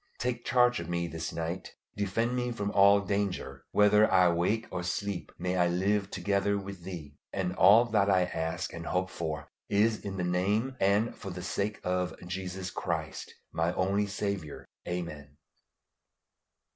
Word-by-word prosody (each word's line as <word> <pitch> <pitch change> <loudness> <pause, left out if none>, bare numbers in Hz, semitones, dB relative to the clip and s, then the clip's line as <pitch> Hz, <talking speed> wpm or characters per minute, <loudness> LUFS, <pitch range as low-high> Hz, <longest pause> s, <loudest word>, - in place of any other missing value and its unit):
Take 120 -1 -2
charge 125 -1 +4
of 85 0 -6
me 85 0 0
this 80 -1 -4
night, 85 +3 -4 0.2
defend 115 +5 0
me 125 0 -1
from 105 -3 -2
all 100 0 +6
danger; 100 -9 -2
whether 105 +1 +5
I 90 -1 +6
wake 95 +7 +1
or 90 - -2
sleep, 95 +1 -3
may 90 0 -1
I 90 -1 +4
live 95 +3 +1
together 100 0 0
with 100 -2 -7
Thee; 85 -5 -7 0.2
and 90 -2 -1
all 105 +6 +7
that 105 -4 +2
I 95 -2 +4
ask 80 -2 -3
or 85 - -6
hope 90 +2 -1
for 80 -3 -4 0.2
is 110 +2 +3
in 100 -1 -6
the 90 - -1
name 100 +9 +1
and 100 +4 +2
for 95 - -7
the 90 -1 -6
sake 100 +2 -2
of 90 0 -1
Jesus 90 0 -4
Christ, - - -3 0.2
my 85 +2 0
only 100 +2 +1
Saviour. 100 -6 -4 0.2
Amen. 80 -5 -5
95 Hz, 160 wpm, -30 LUFS, 90-105 Hz, 0.2 s, all